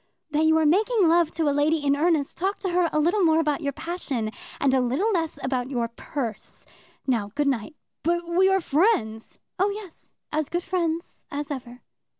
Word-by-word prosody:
"That 305 +1 +2
you 320 0 +5
are 320 - +3
making 410 +5 +3
love 335 -1 +4
to 325 - -1
a 285 - +3
lady 295 +1 +1
in 280 0 +4
earnest, 310 -2 +1
talk 385 +4 -1
to 380 - -1
her 350 -1 +2
a - - 0
little 355 +6 +2
more 320 -1 +4
about 300 -1 0
your 285 -2 -1
passion 275 -8 -3 0.3
and 275 -2 +2
a 260 - +4
little 270 - +1
less 330 -6 -1
about 255 -1 -1
your 240 -4 -1
purse. 230 -2 -6 0.4
Now, 230 -6 0
good 290 0 +1
night." 270 +3 -1 0.3
"But 345 +1 0
we 365 +3 +4
are 385 0 +3
friends." 275 - +1 0.2
"Oh 390 +2 +3
yes; 400 -4 -9 0.2
as 305 -1 -1
good 345 0 -2
friends 340 -3 -2
as 290 +1 -4
ever." 250 -2 -7
315 Hz, 195 wpm, -25 LUFS, 275-345 Hz, 0.4 s, you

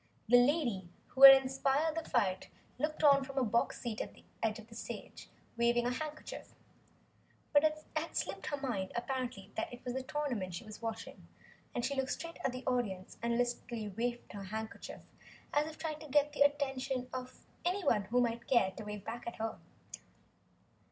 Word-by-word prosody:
The 245 +3 +7
lady 245 - +2 0.2
who 265 - -6
had 270 0 +13
inspired 270 +4 +1
the 325 0 -4
fight 195 -7 +1 0.3
looked 305 +2 -1
on 280 -2 +7
from 270 0 -8
her 265 - +2
box 235 0 +1
seat 230 -3 -3
at - - -6
the - - -18 0.2
side 220 -1 +1
of 220 - -10
the 230 - -14
stage, 225 - -8 0.3
waving 235 0 +3
her 245 - +1
handkerchief. 305 +4 -6 1.0
But 290 0 +6
it 310 0 +1
had 315 +2 -2
slipped - - -2
her 290 - -1
mind 230 -9 -2
apparently 245 -5 -3
that 220 - -3
it 245 +1 -11
was 245 - -2
the 265 - -2
tournament 255 - -2
she 175 - -6
was 215 0 -10
watching, 225 -1 -6 0.5
and 240 - 0
she 280 - 0
looked 265 -1 0
straight 335 0 -7
at 265 - +1
the 255 +1 -7
audience 205 -7 -2
and 235 0 +1
listlessly 240 -3 -2
waved 240 +4 -3
her 200 -1 -6
handkerchief 220 +3 -6 0.5
as 295 +1 +3
if 315 0 -8
trying 310 -2 -4
to 310 - -9
attract 290 +1 +3
the 290 - -5
attention 270 -3 +2
of 255 0 -7 0.2
anyone 350 - +2
who 245 +5 +2
might 235 -1 -1
care 235 -7 +4
to 215 - -8
wave 210 -1 -6
back 235 +1 -6
at 235 - -4
her. 225 0 -3
245 Hz, 190 wpm, -34 LUFS, 225-285 Hz, 1.0 s, had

